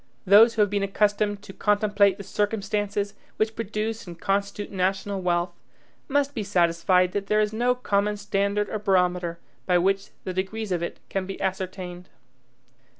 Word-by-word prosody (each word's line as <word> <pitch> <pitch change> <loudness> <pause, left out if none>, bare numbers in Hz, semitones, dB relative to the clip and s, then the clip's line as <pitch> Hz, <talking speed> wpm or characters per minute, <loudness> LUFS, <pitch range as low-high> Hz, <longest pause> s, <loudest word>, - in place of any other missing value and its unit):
Those 215 +4 +7
who 215 - +5
have 205 - 0
been 205 -1 0
accustomed 205 +1 +1
to 195 - -10
contemplate 205 -2 +2
the 200 - -7
circumstances 205 0 -1 0.2
which 220 +1 0
produce 220 0 -3
and 170 -1 -9
constitute 200 +1 -1
national 195 +1 -1
wealth, 175 0 0 0.6
must 285 0 +1
be 225 - -3
satisfied 180 -1 +2
that 200 +1 -3
there 210 +1 +3
is 210 0 +1
no 245 +3 +2
common 210 -4 0
standard 200 0 0
or 215 - -3
barometer 180 -4 +1 0.3
by 180 -1 +4
which 195 +2 +1
the 185 - -4
degrees 195 +3 -3
of 175 -2 0
it 170 - -4
can 190 -1 -2
be 195 - -6
ascertained. 185 -1 -4
200 Hz, 160 wpm, -25 LUFS, 185-210 Hz, 0.6 s, Those